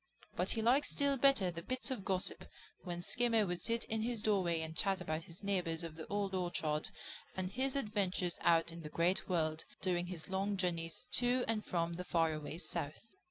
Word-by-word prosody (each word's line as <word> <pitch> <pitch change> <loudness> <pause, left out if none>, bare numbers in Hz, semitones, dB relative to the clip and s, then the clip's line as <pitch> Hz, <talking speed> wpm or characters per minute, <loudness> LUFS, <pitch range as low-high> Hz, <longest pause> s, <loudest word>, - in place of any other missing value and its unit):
But - - 0
he 225 - +1
liked 270 +6 +4
still 280 -1 +2
better 260 -9 +4
the 170 0 -6
bits 255 +7 -1
of 245 -7 -2
gossip 190 -2 0 0.4
when 175 -1 -4
Skimmer 230 0 +2
would 175 -2 -2
sit 230 +3 0
in 220 0 -2
his 230 -1 -1
doorway 180 -6 +2
and 160 0 -5
chat 195 +1 +1
about 160 -2 -3
his 170 +4 -12
neighbors 180 -4 +1
of 165 -2 -5
the 160 -1 -7
Old 200 -1 -1
Orchard 165 -4 0 0.5
and 185 0 -1
his 260 +4 0
adventures 200 -8 0
out 165 0 +4
in 170 0 -8
the 150 - -6
Great 175 +5 +1
World 160 -3 +1 0.2
during 180 -2 0
his 175 -3 -6
long 195 +1 0
journeys 170 +3 -2
to 245 +1 +3
and 220 -2 0
from 170 -1 -1
the 180 +2 -4
far 165 -3 +2
away 155 +1 -5
South. 170 0 -3
185 Hz, 200 wpm, -36 LUFS, 170-220 Hz, 0.5 s, liked